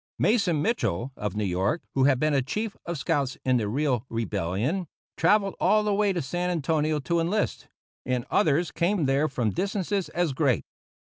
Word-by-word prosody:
Mason 190 -9 +2
Mitchell, 135 - -1
of 105 -2 -4
New 105 - -1
York, 95 - 0
who 135 -1 +3
had 135 -3 +4
been 155 +1 +2
a 135 - +3
chief 210 - -3
of 170 -1 -2
scouts 135 -2 -1
in 130 -1 +3
the 110 -3 -1
Riel 130 0 0
Rebellion, 115 - -2 0.3
travelled 200 +3 +3
all 215 0 +3
the 210 -1 +1
way 205 0 +2
to 175 -5 -2
San 175 +6 -2
Antonio 155 -2 0
to 170 +4 0
enlist; 185 +6 -1 0.4
and 125 -1 -1
others 165 -3 +2
came 175 -1 +1
there 135 +3 +2
from 120 -6 -1
distances 195 0 -1
as 175 -5 0
great. 130 -3 +1
155 Hz, 180 wpm, -26 LUFS, 130-185 Hz, 0.4 s, had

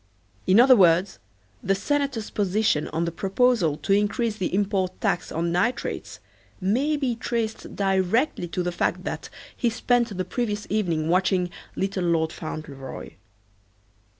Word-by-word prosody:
In 190 +4 +6
other 255 +1 +8
words 185 -1 +4 0.4
the 195 - +1
senator's 275 +1 -1
position 205 -5 +1
on 165 +2 -1
the 170 - -2
proposal 195 -3 +2
to 195 - 0
increase 210 +2 +1
the 185 - -2
import 190 -2 0
tax 195 -4 -1
on 170 +1 -1
nitrates 190 +9 -1 0.4
may 255 +11 +1
be 260 -5 -1
traced 230 -1 -3
directly 195 - +1
to 180 +1 -2
the 175 - -1
fact 170 - -1
that - - -5 0.3
he 240 - +1
spent 235 -2 0
the 185 - -1
previous 210 +1 -2
evening 170 -7 0
watching 180 0 +2 0.2
"Little 190 -1 -1
Lord 160 -2 +1
Fauntleroy." 140 -4 -7
195 Hz, 140 wpm, -25 LUFS, 175-230 Hz, 0.4 s, other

